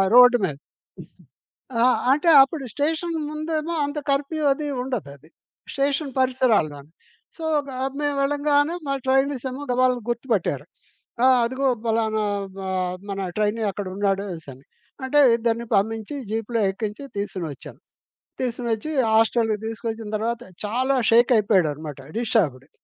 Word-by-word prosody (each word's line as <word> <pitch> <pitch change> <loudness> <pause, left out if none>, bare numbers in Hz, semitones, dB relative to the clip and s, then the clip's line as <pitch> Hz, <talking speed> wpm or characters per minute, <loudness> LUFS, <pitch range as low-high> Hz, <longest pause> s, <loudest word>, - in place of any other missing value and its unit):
Road 245 0 +8
మీద. 150 - -3 1.3
ఆ! - - +5 0.3
అంటే 300 +4 +2
అప్పుడు 275 +1 -4
స్టేషన్ 320 +3 -1 0.2
ముందేమో 310 +1 -3
అంత 290 +1 -5
కర్ఫ్యూ 290 +3 -1
అది 295 +2 -5 0.2
ఉండదది 155 - -6 0.4
స్టేషన్ 280 0 -1
పరిసరాలులో‌న్ని. 210 - +1 0.4
సో, 325 - -8 0.2
గా 265 - -7 0.2
మేము 290 -1 0
వెళ్ళంగానే 290 +2 +2
మా 275 - 0
ట్రైనీసేమో 265 0 0
గబాలను 250 0 +2
గుర్తుపట్టారు. 235 -5 -1 0.6
ఆహ్, 260 -1 +6
అదిగో 260 +3 -1 0.2
పలానా 220 -1 +1 0.3
మా 190 -1 -5 0.4
మన 195 - -3 0.2
ట్రైనీ 215 +2 0
అక్కడున్నాడనిసన్ని. 190 -8 -3 0.4
అంటే 265 +3 +2 0.2
ఇద్దరిని 235 0 -1
పంపించి 220 +5 -1
జీప్‌లో 225 +1 -2
ఎక్కించి 210 +5 -5
తీసుని 195 -4 -3
ఒచ్చాము. 135 - -12 0.6
తీసుకొనోచ్చి, 240 +2 -2 0.2
హాస్టల్‌కి 225 0 +3
తీసుకొచ్చిన 225 0 -5
తర్వాత 230 +2 -2 0.2
చాలా 255 +6 0
షేక్ 235 +2 +5
అయిపోయాడనమాట 160 - +1 0.2
డిస్టబ్డ్‌కి. 145 - 0
235 Hz, 115 wpm, -23 LUFS, 205-275 Hz, 1.3 s, Road